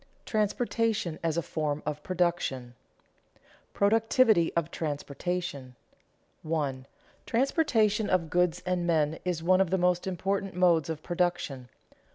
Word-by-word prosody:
TRANSPORTATION 215 -4 0
AS 165 -1 -1
A 170 - 0
FORM 150 -1 -2
OF 150 0 -3
PRODUCTION 170 -9 -1
[Sidenote: 120 - -34
Productivity 220 -2 +3
of 170 -1 -1
transportation] 145 -2 -4 0.7
1. 145 -5 -2 0.4
_Transportation 230 - +2
of 170 -4 +1
goods 180 0 +1
and 180 -1 -1
men 160 -2 +1
is 175 -3 -2
one 185 +2 +4
of 190 - +1
the 190 - +1
most 180 0 +1
important 195 +1 -2
modes 170 -4 +3
of 155 -1 -4
production. 175 -8 -2
175 Hz, 125 wpm, -28 LUFS, 155-190 Hz, 0.7 s, one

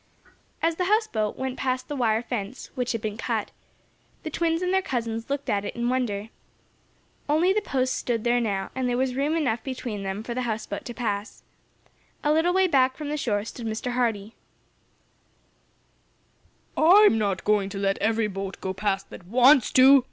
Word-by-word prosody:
As 330 0 +1
the 365 - 0
houseboat 360 - 0
went 260 0 -3
past 255 -1 -1
the 295 - -4
wire 230 -3 +1
fence, 235 0 -5
which 250 -1 -2
had 230 - -3
been 215 -1 -4
cut, - - -2 0.7
the 315 - -5
twins 330 +2 0
and 365 +1 0
their 380 - +3
cousins 230 - -3
looked 280 0 -3
at 205 -4 0
it - - -5
in 240 0 -1
wonder. 225 -5 -1 1.0
Only 335 +6 +3
the 425 - +1
posts 260 -8 -1
stood 230 -3 -2
there 240 0 +2
now, 195 -4 -2
and 260 -1 -1
there 245 - 0
was 260 0 0
room 285 +5 0
enough 245 -8 0
between 245 -6 -5
them 195 +2 -4
for 235 - -4
the 255 - -2
houseboat 220 -4 -4
to 240 - -7
pass. 210 -4 -3 0.8
A 295 0 +3
little 325 +3 +3
way 380 +1 +3
back 260 -6 +3
from 295 0 -5
the 300 - -1
shore 210 -7 -1
stood 230 0 -6
Mr. 220 +3 -3
Hardee. 225 -4 -1 2.4
"I'm 350 - +6
not 200 -3 -1
going 205 -2 +2
to 200 - -6
let 195 0 0
every 225 +1 +1
boat 195 -1 -5
go 190 - -3
past 195 0 -2
that 175 - -11
wants 255 +4 +5
to!" 270 +2 +8
245 Hz, 185 wpm, -25 LUFS, 210-275 Hz, 2.4 s, to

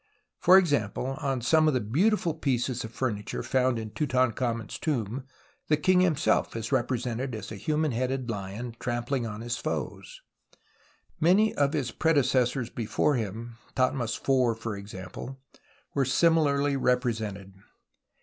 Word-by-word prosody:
For 185 +2 +7
example, 135 - +1
on 135 -3 -1
some 155 +6 +4
of 150 - +2
the - - +3
beautiful 165 - +1
pieces 130 -5 -1
of 110 - -7
furniture 110 -5 -3
found 130 -2 +1
in 110 -1 -5
Tutan 130 +1 +1
khamen's 115 -2 -3
tomb 130 -3 -2 0.4
the 150 - +3
king 180 +4 +3
himself 170 -10 +2
is 115 +1 -4
represented 125 -1 -1
as 105 -1 -7
a 105 - -7
hi? 155 +9 -1
man 155 -1 +1
headed 130 +1 -1
lion 110 +2 -5
trampling 120 +1 -2
on 105 0 -6
his 120 0 -3
foes, - - -5 0.3
and - - -26 0.6
many 190 +7 +4
of 140 +1 +1
his 135 -6 -1
predecessors 130 -5 +1
before 120 +5 0
him, 115 0 -4 0.2
Thothmes 130 -3 0
IV^ 125 -4 +2
for 115 -1 -4
example, 100 +6 -8 0.5
were 140 - +2
similarly 145 -1 +3
represented. 110 -7 -1
125 Hz, 145 wpm, -28 LUFS, 115-140 Hz, 0.6 s, For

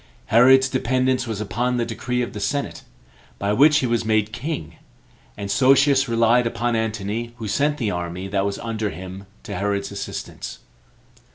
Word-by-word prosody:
Herod's 130 +3 +7
dependence 130 -1 0
was 110 -3 -3
upon 125 +4 -1
the 120 - 0
decree 125 +2 -2
of 120 - -6
the 105 - -5
senate, 140 +7 -2 0.6
by 100 +1 0
which 145 +6 +6
he 135 - +1
was 115 -1 0
made 110 -1 +1
king; 120 - -5 0.6
and 100 -1 -4
Sosius 135 0 +4
relied 115 +1 +3
upon 120 0 -1
Antony, 110 +1 -3
who 115 -2 -5
sent 145 +8 +1
the 110 -7 -1
army 90 +2 -4
that 95 0 0
was 100 0 -2
under 110 -2 -3
him 95 +2 -9 0.2
to 100 - -6
Herod's 100 +1 -1
assistance. 100 - -6
115 Hz, 165 wpm, -22 LUFS, 100-125 Hz, 0.6 s, Herod's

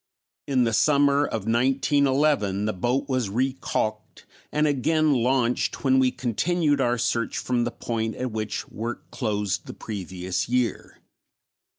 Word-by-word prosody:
In 130 -3 +2
the 115 -1 0
summer 145 +3 +4
of 110 -3 -4
1911 135 -3 +2
the 110 - 0
boat 125 +9 -1
was 130 -6 -1
recalked 115 -2 -2 0.3
and 150 0 +2
again 155 +2 +2
launched 125 -1 +1
when 130 -1 +4
we 130 -1 +4
continued 145 +5 0
our 120 -1 +1
search 115 0 -1
from 120 -1 0
the 120 - -2
point 115 -2 -3
at 130 -1 -3
which 110 -1 -4
work 115 +2 -6
closed 105 -5 -2
the - - -8
previous 95 -2 -4
year. 125 -1 -1
125 Hz, 140 wpm, -25 LUFS, 110-140 Hz, 0.3 s, summer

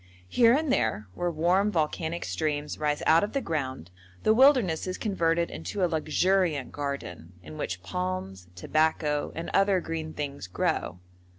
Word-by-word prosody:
Here 235 -1 +5
and 295 -2 +1
there, 105 - 0
where 175 - -1
warm 175 +6 +2
volcanic 160 0 -1
streams 150 -2 -2
rise 150 -1 0
out 165 +3 +5
of 205 - -3
the 275 - +1
ground, 130 - -4 0.3
the 215 - +5
wilderness 240 - +4
is 185 - -3
converted 170 -5 0
into 200 -3 -4
a - - +6
luxuriant 165 -2 +1
garden, 90 - -5
in 80 -2 -10
which 90 +3 -4
palms, 95 +1 -4
tobacco, 150 - 0
and 165 - -5
other 195 -1 +4
green 160 -2 -5
things 140 -8 -5
grow. 90 0 -1
160 Hz, 155 wpm, -27 LUFS, 135-185 Hz, 0.3 s, a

